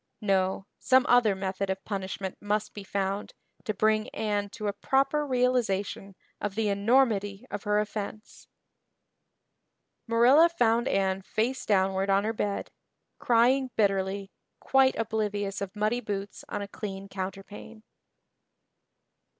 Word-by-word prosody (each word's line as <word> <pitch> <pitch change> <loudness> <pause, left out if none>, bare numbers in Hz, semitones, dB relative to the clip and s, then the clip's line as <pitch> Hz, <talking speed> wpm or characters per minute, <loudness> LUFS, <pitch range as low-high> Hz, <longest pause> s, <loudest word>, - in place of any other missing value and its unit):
No, 190 -2 +1
some 260 0 +4
other 235 -5 +4
method 190 0 -3
of 190 0 -3
punishment 190 -2 -4
must 210 +1 -1
be 205 - -8
found 195 +1 -3 0.3
to - - 0
bring 215 +1 +2
Anne 205 -2 -1
to 215 +1 -7
a 205 - 0
proper 275 +6 +1
realization 235 -7 0 0.2
of 205 -2 -3
the 220 -1 0
enormity 205 0 +2
of 205 +1 -5
her 210 0 +2
offense. 210 0 -6 1.6
Marilla 250 +9 +6
found 240 -6 +2
Anne 195 -2 +1
face 235 +7 -2
downward 190 -1 +2
on 195 +1 +3
her 220 +1 -1
bed, 205 -2 -3 0.5
crying 250 +3 +3
bitterly, 195 -1 0 0.3
quite 265 0 +3
oblivious 205 -3 -2
of 200 +1 -5
muddy 215 +3 0
boots 200 -2 -5
on 205 - -3
a - - -6
clean 195 -1 -7
counterpane. 195 +3 -7
205 Hz, 125 wpm, -28 LUFS, 195-230 Hz, 1.6 s, Marilla